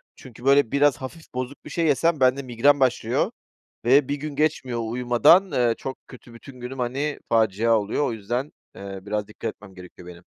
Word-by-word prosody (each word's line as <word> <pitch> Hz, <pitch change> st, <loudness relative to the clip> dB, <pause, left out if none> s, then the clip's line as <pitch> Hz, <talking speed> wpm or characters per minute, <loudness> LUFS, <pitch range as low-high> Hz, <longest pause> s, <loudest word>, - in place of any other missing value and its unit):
çünkü 125 Hz, -1 st, -13 dB
böyle 140 Hz, -3 st, +4 dB
biraz 140 Hz, 0 st, +3 dB
hafif 145 Hz, +4 st, -10 dB
bozuk 130 Hz, +2 st, -6 dB
bir -, -, -8 dB
şey 170 Hz, -1 st, -1 dB
yesem 155 Hz, +2 st, +2 dB
bende 130 Hz, +2 st, +3 dB
migren 130 Hz, +4 st, +3 dB
başlıyor 130 Hz, -2 st, +1 dB, 0.5 s
ve 135 Hz, +3 st, +4 dB
bir 145 Hz, -, -1 dB
gün 145 Hz, 0 st, -7 dB
geçmiyor, 130 Hz, -6 st, 0 dB
uyumadan, 125 Hz, +11 st, +3 dB
ııı, 120 Hz, -2 st, +2 dB
çok 135 Hz, -1 st, -6 dB
kötü 120 Hz, -2 st, -14 dB
bütün 130 Hz, +1 st, -13 dB
günüm, 125 Hz, +2 st, -7 dB
hani, 135 Hz, +5 st, -2 dB
facia 110 Hz, 0 st, +2 dB
oluyor. 105 Hz, +8 st, -1 dB
O -, -, -2 dB
yüzden, 120 Hz, +7 st, -4 dB, 0.2 s
eee, 100 Hz, -1 st, -8 dB
biraz 105 Hz, 0 st, -2 dB
dikkat 110 Hz, +1 st, -6 dB
etmem 95 Hz, -3 st, -16 dB
gerekiyor 90 Hz, -1 st, -13 dB
benim. 85 Hz, 0 st, -12 dB
125 Hz, 185 wpm, -24 LUFS, 115-140 Hz, 0.5 s, böyle